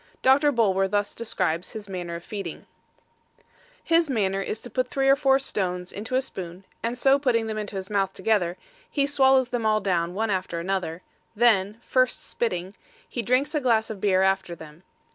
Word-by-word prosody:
Doctor 285 +3 +5
Bulwer 195 -6 +2
thus 205 +1 -1
describes 185 -6 -2
his 215 -2 -7
manner 175 -3 -5
of 170 - -7
feeding: 195 -5 -6 1.2
His 330 -2 +3
manner 195 -6 0
is 210 - -4
to 245 - -9
put 255 +2 0
three 270 +1 0
or 275 - +7
four 270 -1 +3
stones 180 -8 -2
into 225 +6 -4
a 260 - +2
spoon, 180 -5 -8 0.2
and 235 +2 -2
so 270 +2 +4
putting 240 -5 +1
them 215 -1 -3
into 210 -1 -6
his 190 -1 -4
mouth 195 -2 +1
together, 190 -5 0 0.3
he 280 -2 +1
swallows 265 -3 +4
them 245 -2 -2
all 215 0 +3
down, 180 -3 -1
one 220 +1 0
after 185 -3 -2
another; 180 -1 -3 0.3
then 210 -3 +3
(first 255 0 +1
spitting) 185 -5 -2 0.3
he 240 - -3
drinks 255 +7 +1
a 300 - 0
glass 225 -4 +2
of 205 -3 -8
beer 190 -2 +3
after 190 -2 0
them. 155 0 -13
210 Hz, 185 wpm, -25 LUFS, 185-250 Hz, 1.2 s, or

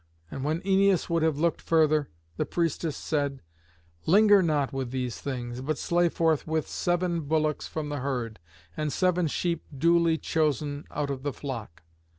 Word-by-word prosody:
And 135 - -5
when 155 +4 -1
Æneas 195 -2 +2
would 165 -1 +2
have 160 -2 +2
looked 170 +2 +1
further, 155 -2 +2 0.3
the - - -1
priestess 165 -2 -1
said, 140 - -2 0.6
"Linger 205 +3 +6
not 150 -6 0
with 135 -2 -3
these 125 -2 -3
things, 125 -2 -4
but 150 +2 -2
slay 175 0 +2
forthwith 160 -1 0
seven 175 -1 0
bullocks 155 0 0
from 155 -2 -4
the 145 -1 -3
herd, 125 -5 -3 0.4
and 150 -1 -2
seven 180 +1 +2
sheep 170 +2 -1
duly 170 +1 +3
chosen 150 -2 -1
out 145 -1 -2
of 135 -1 -4
the 145 +1 -2
flock." 120 - -7
155 Hz, 160 wpm, -27 LUFS, 140-170 Hz, 0.6 s, Linger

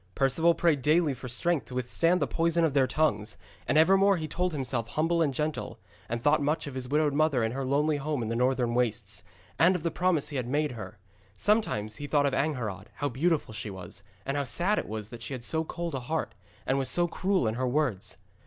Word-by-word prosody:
Perceval 150 +5 +3
prayed 160 -5 +2
daily 155 +1 +3
for 125 0 -8
strength 160 +6 0
to 125 - -8
withstand 165 +8 +2
the - - +1
poison 170 0 +1
of 155 - 0
their 135 -2 +3
tongues, 110 -10 0 0.3
and - - +2
evermore 195 +4 +5
he 155 -2 -4
held 180 +1 +1
himself 130 -6 -2
humble 165 +5 +1
and 150 -4 +2
gentle, 150 +3 -3 0.3
and 115 +1 -2
thought 150 +1 +4
much 150 +4 0
of 145 - -6
his 130 -1 -4
widowed 150 0 +2
mother 145 -5 +2
in 110 - 0
her 135 +2 -3
lonely 145 +3 +1
home 145 -3 -2
in - - -3
the 115 - -2
northern 125 -1 +1
wastes, 110 -6 -1 0.4
and 180 +5 +5
of 170 - -3
the 170 - 0
promise 175 -3 +1
he 145 - -4
had 125 -2 -2
made 150 +3 0
her. 105 -6 -8 0.4
Sometimes 110 - +1
he 145 - -6
thought 145 -1 +2
of 140 - +1
Angharad, 115 -10 -2
how 145 - -1
beautiful 150 -1 0
she 110 - -5
was, 95 0 -8 0.2
and 135 - -2
how 145 - +1
sad 175 - +1
it - - -5
was 110 -1 -5
that 120 -1 -9
she 125 +4 -4
had 120 - -8
so 160 +6 0
cold 170 0 -5
a 135 - -2
heart, 125 -1 -3 0.3
and 135 +1 +1
was 135 - -1
so 175 0 +2
cruel 190 -2 0
in 110 - 0
her 130 +2 -1
words. 125 -9 -1
140 Hz, 230 wpm, -28 LUFS, 120-160 Hz, 0.4 s, evermore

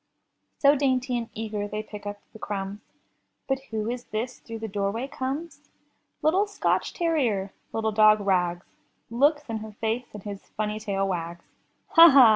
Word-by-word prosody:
So 285 +1 +6
dainty 260 -2 +1
and 235 -1 -2
eager 215 -2 -3
they 210 +1 -4
pick 210 -1 -9
up 205 0 -5
the 220 - -11
crumbs. 200 -1 -4 0.7
But 270 -1 +1
who 220 -1 -2
is 245 +1 -3
this 230 +4 -4
through 230 -1 -7
the 220 0 -5
doorway 205 +5 -1
comes? 280 +5 -5 0.5
Little 375 +7 +3
Scotch 405 - 0
terrier, 250 - 0 0.2
little 220 0 0
dog 215 0 +6
Rags, 180 -3 +1 0.5
Looks 290 +5 +3
in 225 -2 -2
her 215 0 -8
face 225 +3 -2
and 205 - -8
his 200 -2 -6 0.2
funny 215 0 -1
tail 195 -2 -1
wags. 170 -2 -3 0.5
''Ha! 335 -4 +10
ha! 265 -5 +9
220 Hz, 165 wpm, -26 LUFS, 205-260 Hz, 0.7 s, Ha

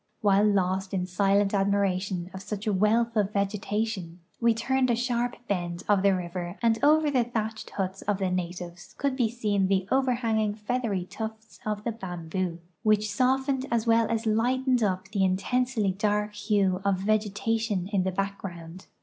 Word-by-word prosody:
While 205 0 +4
lost 190 -1 +1
in 180 -1 0
silent 195 +2 +2
admira 200 -2 +2
tion 185 -2 -4
of 190 - -7
such 205 +1 -5
a 210 - +1
wealth 225 +4 +2
of 205 -2 +1
vegetation, 200 -2 -2 0.2
we 235 0 +4
turned 260 +3 +1
a 240 - +3
sharp 245 0 -1
bend 175 -3 -2
of 205 -2 +4
the 195 -1 +4
river 175 +1 -5
and 225 -1 +1
over 305 0 +5
the 255 -3 +3
tliatched 220 -2 -4
huts 195 -1 -3
of 205 -1 0
the 190 -2 -1
natives 175 -1 -5
could 280 -2 0
be 240 -4 +1
seen 210 -4 0
the 190 -1 +1
overhanging 230 -5 +1
feathery 210 -4 -2
tufts 220 +2 -7
of 210 -1 -2
the 235 - -1
bamboo, 180 -4 -4 0.3
w'hich 215 -1 +3
softened 265 +3 +1
as 230 -1 +1
well 230 -1 +4
as 230 0 -1
lightened 250 +3 +2
up 185 -3 0
the 200 -1 0
intensely 215 +3 +1
dark 210 +2 0
hue 200 -3 +1
of 195 -2 +1
vege 215 0 +1
tation 220 -3 -1
in 195 - +3
the 190 +1 0
background. 185 -3 -5
205 Hz, 175 wpm, -27 LUFS, 190-230 Hz, 0.3 s, over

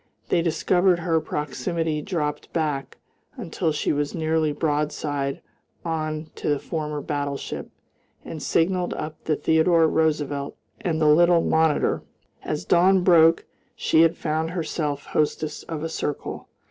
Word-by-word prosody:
They 170 - +3
discovered 175 +2 +2
her 165 -1 +1
proximity, 150 +2 -2
dropped 150 -4 -3
back 145 -5 -2 0.4
until 170 -6 -2
she 150 - 0
was 145 0 -2
nearly 160 -1 +1
broadside 145 -2 -2 0.4
on 155 -1 -3
to - - -2
the 145 - +2
former 150 -1 -4
battleship, 145 -1 -4 0.6
and 155 - -7
signalled 180 +4 +1
up 155 0 -6
the 155 - +1
Theodore 160 +2 +3
Roosevelt 150 -3 0 0.2
and 175 -8 -1
the 155 - +2
little 170 +3 +5
Monitor. 160 -2 +2 0.4
As 90 - -4
dawn 185 - +4
broke 165 -2 +5 0.3
she 160 - +3
had 165 0 +4
found 160 0 -1
herself 155 -4 -3
hostess 150 0 -1
of 160 -2 -4
a 165 - -2
circle. 150 -2 -4
160 Hz, 135 wpm, -24 LUFS, 150-165 Hz, 0.6 s, little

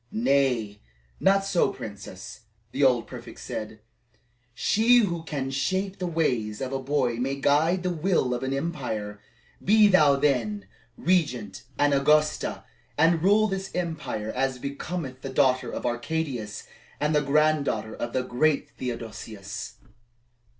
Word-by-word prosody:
"Nay, 135 - +1 0.4
not 195 0 +3
so, 190 -3 +2
Princess," 100 -3 -9 0.3
the 140 - 0
old 125 -3 +4
prefect - - -10
said. 110 0 -6 0.7
"She 230 - +4
who 175 -8 +1
can 140 -4 -4
shape 190 +8 -1
the 180 - -2
ways 125 -11 0
of 135 0 -4
a 135 - -1
boy 130 -3 0
may 135 +3 -1
guide 155 +6 +2
the 180 - 0
will 165 -6 +1
of 120 - -3
an 130 0 -2
empire. 125 -9 -3 0.4
Be 215 +2 +6
thou, 155 -8 +5
then, 120 -8 0 0.3
Regent 130 - 0
and 145 0 +3
Augusta, 150 +2 +2 0.3
and 160 +1 +4
rule 205 +4 +4
this 195 -1 -3
empire 160 -11 -3
as 130 0 0
becometh 140 0 -5
the 135 - -5
daughter 130 -1 +2
of - - -5
Arcadius 120 -3 -3 0.3
and 150 +1 +1
the 150 - +3
granddaughter 140 -7 +1
of 120 - -4
the 130 +1 0
great 140 +4 +1
Theodosius." 110 -4 -6
140 Hz, 135 wpm, -26 LUFS, 120-165 Hz, 0.7 s, Be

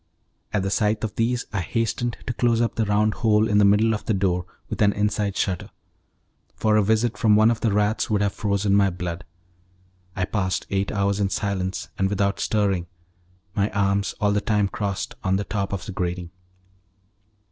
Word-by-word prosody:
At 100 -3 0
the 95 - -1
sight 105 +1 +1
of 110 - -2
these 120 +2 0
I 100 - 0
hastened 115 +6 -1
to 125 - -2
close 120 -1 +2
up 120 -1 +1
the 115 - 0
round 105 +1 +2
hole 110 -1 +3
in 105 -1 +3
the - - +5
middle 105 +3 +4
of 105 - -4
the 110 - +1
door 90 -2 0 0.2
with - - -5
an 100 -1 +4
inside 105 -1 -1
shutter, 95 -3 -1 0.9
for 110 -1 +2
a 110 - +5
visit 110 +3 +1
from 110 -3 +4
one 110 +2 +5
of 115 - -2
the 115 - +1
rats 105 +2 +1
would 105 -2 +2
have 100 - 0
frozen 100 -1 0
my 100 -1 +4
blood. 90 -1 -5 0.9
I 90 - 0
passed 95 -2 -1
eight 100 0 0
hours 100 0 0
in 100 -1 +1
silence 95 -2 -2
and 95 0 +2
without 100 0 0
stirring, 100 -5 0 0.7
my 100 +1 +1
arms 100 0 +1
all 105 -1 +2
the 105 0 +1
time 105 -2 +1
crossed 100 -2 -3
on 95 -1 +2
the 100 - 0
top 100 0 -3
of 100 -2 -4
the 105 - -6
grating. 90 -1 -3
100 Hz, 195 wpm, -24 LUFS, 95-110 Hz, 0.9 s, the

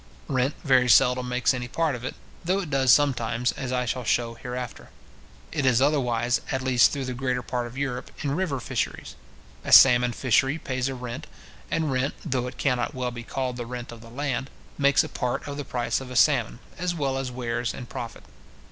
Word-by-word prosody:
Rent 135 0 0
very 130 -3 +4
seldom 125 0 +4
makes 125 +2 +2
any 125 -1 -4
part 160 +3 0
of 125 -1 -6
it, 130 - -4 0.3
though 185 +3 +1
it 165 -6 -7
does 135 -2 +4
sometimes, 125 -4 +2
as 130 -2 -5
I 125 0 0
shall 125 +1 -2
shew 115 +1 0
hereafter. 125 +1 -7 0.6
It 145 - -1
is 130 -3 +4
otherwise, 125 -4 +1
at 130 -1 -1
least 125 -2 +5
through 140 -2 -3
the 125 - -3
greater 125 0 -2
part 120 -1 -3
of 120 +2 -11
Europe, 130 -3 -3
in 140 - 0
river 165 -7 -1
fisheries. - - -3 0.5
A - - -4
salmon 125 -2 +8
fishery 130 +4 +2
pays 130 -4 -2
a 135 - -4
rent; 125 -1 -6 0.4
and 160 -3 0
rent, 130 +2 0
though 130 -5 -1
it 125 - -8
cannot 125 0 0
well 125 -1 -2
be 120 0 -7
called 125 +1 -3
the 120 -1 -5
rent 120 0 -6
of 115 -1 -11
land, 135 0 -2 0.3
makes 140 -1 +4
a - - -5
part 125 +2 -3
of 140 - -5
the 145 - -4
price 120 0 -1
of 130 - -8
a 125 - -7
salmon, - - +3 0.2
as 175 0 -1
well 140 -4 -1
as 135 -1 -2
wares 120 -1 -2
and 125 - -8
profit. 120 -3 -7
125 Hz, 205 wpm, -25 LUFS, 125-135 Hz, 0.6 s, salmon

